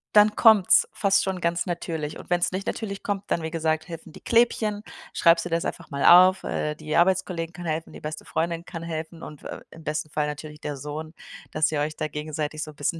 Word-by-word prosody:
dann 210 0 +6
kommt's 220 -5 +6
fast 200 -1 +3
schon 190 -2 -3
ganz 170 0 0
natürlich 165 -3 -4
und - - -12
wenn's 175 0 +2
nicht 190 +1 -4
natürlich 200 -3 -4
kommt, 200 -1 -2
dann, 170 - +1
wie 160 - -2
gesagt, 160 -1 -1
helfen 165 -1 -9
die - - -12
Klebchen. 220 -3 +2 0.3
Schreibst 165 -1 +4
du - - -4
dir 165 - +1
das 170 - -1
einfach - - -5
mal 140 0 -1
auf, 185 +2 +8
äh, 150 0 -2
die 155 0 -4
Arbeitskollegin 175 -2 +1
kann 175 +1 -8
helfen, 160 0 -3
die - - -9
beste 150 0 -6
Freundin 165 +1 -2
kann 165 -2 -7
helfen 165 0 -6
und 150 -2 -9
w - - -6
äh, - - -7
im 165 - -13
besten 155 0 -3
Fall 150 -1 0
natürlich 150 0 -7
der 145 -1 -4
Sohn, 150 +3 -6 0.4
dass 155 0 +1
ihr 150 -2 0
euch 150 +1 -2
da - - -1
gegenseitig 150 0 -4
so - - -7
'n - - -20
bisschen 145 +4 -2
165 Hz, 235 wpm, -25 LUFS, 155-180 Hz, 0.4 s, auf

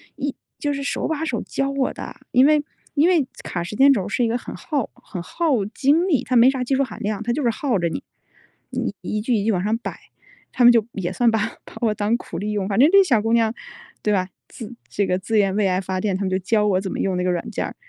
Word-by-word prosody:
一 285 -1 -3 0.2
就 290 -1 -1
是 280 - -4
手 275 - -2
把 320 0 -2
手 - - -2
教 275 0 -2
我 275 -1 0
的， - - -8 0.2
因 255 +2 +5
为 300 0 +4 0.3
因 310 +4 +4
为 315 -8 +3 0.2
卡 175 -1 -3
时 175 - -6
间 275 +4 +6
轴 200 -8 +1
儿 - - -6
是 245 - 0
一 - - +2
个 235 +2 0
很 - - -8
耗 285 -7 -3
很 180 -4 -8
耗 280 - 0
精 285 - +2
力， 290 -9 +2
它 255 - -1
没 245 +3 +7
啥 260 -2 -2
技 265 +2 0
术 275 - +2
含 225 -6 -7
量， 215 +1 -2
它 235 - 0
就 295 - -1
是 240 - +2
耗 230 -2 0
着 170 - 0
你。 - - -5 0.7
你 - - -3
一 210 0 -3
句 245 +3 0
一 210 -3 +1
句 225 - +2
往 180 -2 0
上 215 +2 +1
摆， - - -6 0.5
他 250 - +1
们 240 - +9
就 230 -3 +3
也 180 -3 -3
算 235 +4 +2
把 220 - +1 0.3
把 - - -13
我 215 -2 +1
当 210 +3 +1
苦 - - -6
力 210 +1 -3
用， 200 -2 -1
反 205 +2 0
正 285 - +8
这 395 0 +7
小 255 - +3
姑 225 - +1
娘 225 -1 +3 0.5
对 210 - +2
吧？ 185 -2 +1 0.2
自 230 0 -9 0.2
这 200 - 0
个 180 -1 0
自 220 +3 -1
愿 195 -2 +2
为 205 -2 +2
爱 185 0 +1
发 185 -1 -3
电， 200 -3 0
他 200 - -6
们 190 - 0
就 185 - +1
教 210 +3 +1
我 190 -2 +2
怎 190 - -4
么 - - -4
用 190 -2 0
那 180 - -1
个 180 - +1
软 175 - -3
件 - - -2
儿， - - -6
225 Hz, 300 characters per minute, -22 LUFS, 195-270 Hz, 0.7 s, 们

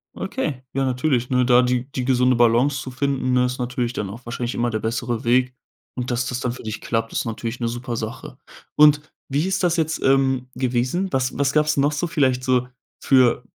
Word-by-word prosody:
Okay, 150 - -4
ja, 135 0 0
natürlich, 125 -1 0
ne? 125 -1 +2
Da 125 0 +5
die 125 0 0
die 130 - -3
gesunde 125 0 +3
Balance 120 +4 +3
zu - - -7
finden, 130 0 -1
ne, 125 0 +3
ist 125 +1 -3
natürlich 125 -1 -2
dann 105 -5 -3
auch 115 +5 -10
wahrscheinlich 120 +1 -4
immer 120 0 0
der 110 - -1
bessere 115 +1 -2
Weg. 125 +2 +2 0.4
Und 125 -1 -4
dass 120 +1 0
das 125 - -3
dann 125 -2 -2
für 125 - -9
dich 110 -1 -5
klappt, 115 -1 -2
ist - - -1
natürlich 115 +1 -4
'ne 120 - -1
super 120 +1 -4
Sache. 110 0 -6 0.4
Und 150 -1 +6 0.3
wie 145 +4 0
ist 190 0 -1
das 175 -1 +2
jetzt, 160 0 -1
ähm, 135 -1 +2
gewesen? 130 +9 -1
Was 130 -1 0
was 140 0 +1
gab's 150 0 +2
noch 140 +1 +3
so 150 +4 -2
vielleicht 130 -6 +1
so 125 -1 +1 0.3
für 125 -2 +3
125 Hz, 210 wpm, -22 LUFS, 120-135 Hz, 0.4 s, Und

